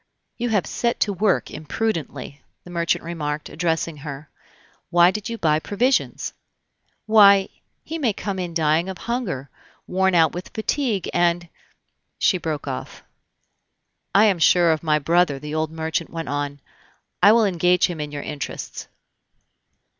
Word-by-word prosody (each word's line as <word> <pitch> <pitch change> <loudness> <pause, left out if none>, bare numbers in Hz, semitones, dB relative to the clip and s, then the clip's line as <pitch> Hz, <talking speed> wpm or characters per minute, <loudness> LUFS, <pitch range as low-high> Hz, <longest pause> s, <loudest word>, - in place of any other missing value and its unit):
"You 240 +1 -1
have 210 -4 +1
set 235 -1 -1
to 205 - +2
work 195 +1 +1
imprudently," 155 - -4 0.2
the 175 - -12
merchant 170 -1 0
remarked, 155 -3 -4
addressing 165 -1 -1
her. 145 0 -8 0.6
"Why 175 +1 +5
did 210 +3 -5
you 230 - -4
buy 155 -5 +2
provisions?" 245 - 0 0.7
"Why, 200 -3 +6 0.3
he 325 +1 -5
may 250 -7 +2
come 195 -1 -4
in 175 -2 -4
dying 160 +2 +2
of 190 - -6
hunger, 185 - -4 0.3
worn 190 0 +1
out 165 -2 +5
with 175 +1 -6
fatigue, 220 - -1
and 175 0 +1 0.4
" - - -54 0.3
She 185 - +2
broke 155 -4 -4
off. 130 -1 -6 1.1
"I 205 +2 +7
am 195 -5 +2
sure 170 +1 +5
of 155 - 0
my 155 -2 +2
brother," 165 0 +2
the 150 +2 -7
old 155 0 0
merchant 160 +1 -3
went 165 -1 -5
on; 145 0 -3 0.6
"I 200 +3 +8
will 225 0 +5
engage 180 -1 +3
him 170 -4 -4
in 150 -1 -5
your 145 -1 -5
interests." 150 -2 -6
170 Hz, 155 wpm, -22 LUFS, 155-200 Hz, 1.1 s, I